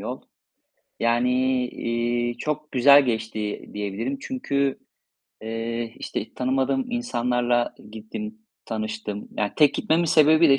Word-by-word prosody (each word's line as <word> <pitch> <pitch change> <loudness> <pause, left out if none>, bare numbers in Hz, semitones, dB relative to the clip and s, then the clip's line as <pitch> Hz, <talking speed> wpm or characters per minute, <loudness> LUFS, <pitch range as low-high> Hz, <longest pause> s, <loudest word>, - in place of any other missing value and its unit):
yol, - - -5 0.8
yani, 120 +2 +2 0.4
eee, 120 0 -1
çok 150 0 -3
güzel 140 +2 +7
geçti 110 -2 -3
diyebilirim. 105 +6 -3
Çünkü, 140 - -1 0.6
eee, 115 +1 -3
işte - - -5
tanımadığım 135 - 0
insanlarla 120 - 0 0.2
gittim, 215 - -7 0.3
tanıştım, 110 -2 -4
yani, 105 -1 0
tek 150 -2 +5
gitmemin 170 -4 +2
sebebi 155 0 +6
de 135 0 +6
120 Hz, 110 wpm, -24 LUFS, 115-150 Hz, 0.8 s, güzel